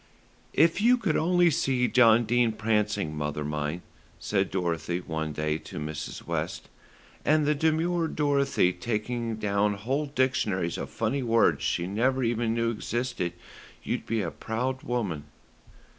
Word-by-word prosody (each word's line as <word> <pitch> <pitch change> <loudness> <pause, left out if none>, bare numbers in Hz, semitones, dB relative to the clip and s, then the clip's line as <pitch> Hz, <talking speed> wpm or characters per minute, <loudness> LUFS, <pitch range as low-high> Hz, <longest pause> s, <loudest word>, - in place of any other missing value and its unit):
"If 165 +4 +4
you 245 +3 +5
could 200 -10 0
only 175 +1 +4
see 130 -3 +1
John 120 -2 +5
Dene 120 0 +2
prancing, 105 -6 0
mother 75 0 -3
mine," 75 +3 -3 0.3
said 100 -2 0
Dorothy 85 -1 -1
one 80 -3 -3
day 75 +1 -1
to - - -10
Mrs. 75 0 -5
West, - - -3 0.5
"and 155 0 +3
the 150 - +3
demure 160 +3 +1
Dorothy 140 - +2
taking 115 +4 -2
down 105 -1 +1
whole 135 +9 -2
dictionaries 125 - 0
of - - -5
funny 115 +5 -1
words 115 -2 +3
she 85 - 0
never 125 +7 +1
even 115 -1 0
knew 115 0 +1
existed, 120 -5 -3 0.5
you'd - - -3
be 115 -2 0
a 85 - -3
proud 125 - -3
woman." 100 -12 -2
115 Hz, 145 wpm, -27 LUFS, 90-130 Hz, 0.5 s, you